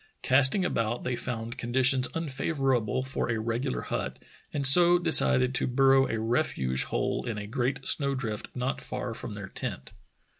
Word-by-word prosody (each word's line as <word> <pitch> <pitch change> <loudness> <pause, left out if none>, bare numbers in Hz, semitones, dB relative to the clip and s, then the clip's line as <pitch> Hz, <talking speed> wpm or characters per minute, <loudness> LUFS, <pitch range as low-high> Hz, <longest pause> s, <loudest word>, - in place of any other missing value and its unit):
Casting 135 +8 +2
about 115 -6 -2
they 125 - -2
found 120 -1 -5
conditions 125 +2 +2
unfavorable 135 -6 -1
for 130 -2 -4
a 115 -1 -1
regular 115 - -3
hut, - - -4 0.3
and 140 -1 -2
so 175 +6 +7
decided 135 -6 +4
to - - 0
burrow 135 +1 +3
a 110 - -2
refuge 110 - -1
hole - - -2
in 115 -3 -4
a 105 - -6
great 130 +4 -3
snow 140 -2 +3
drift 110 -5 -5
not 125 +1 -3
far - - -5
from - - -7
their - - -8
tent. 65 - -7
130 Hz, 160 wpm, -27 LUFS, 115-135 Hz, 0.3 s, so